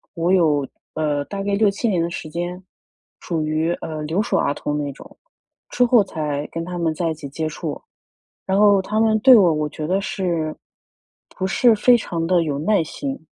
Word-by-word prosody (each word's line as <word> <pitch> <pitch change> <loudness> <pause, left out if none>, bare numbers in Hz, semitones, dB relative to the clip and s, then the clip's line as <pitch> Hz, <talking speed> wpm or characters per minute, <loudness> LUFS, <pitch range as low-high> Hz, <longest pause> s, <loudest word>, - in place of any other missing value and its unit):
我 170 +2 +1
有， 150 -7 +2 0.3
呃， 150 -2 0
大 200 +4 -5
概 200 0 -2
6-7 210 +2 +1
年 185 -6 +1
的 170 - -1
时 165 - -6
间， 175 +3 -4 0.6
属 165 -3 -2
于， 155 +2 0
呃， 155 -1 -5
留 165 +7 0
守 - - -1
儿 145 - +1
童 150 0 -3
那 145 -1 -3
种， - - -15 0.5
之 250 - +2
后 235 -4 +5
才 150 -5 -4
跟 165 0 -4
他 180 0 -5
们 165 -2 0
在 165 +1 -1
一 - - -2
起 150 -2 -8
接 155 +3 -3
触。 155 -1 -6 0.7
然 190 +1 +1
后 205 -2 +5
他 210 +3 -2
们 220 -1 +3
对 255 +2 +8
我， 185 -6 +5
我 150 0 -1
觉 155 +1 -6
得 185 +4 +1
是 175 -5 -2 0.8
不 190 - -1
是 235 +5 +4
非 245 +4 +5
常 170 -7 -3
地 175 -1 +3
有 145 -3 -2
耐 185 +5 +2
心。 270 - -6
170 Hz, 210 characters per minute, -21 LUFS, 155-200 Hz, 0.8 s, 对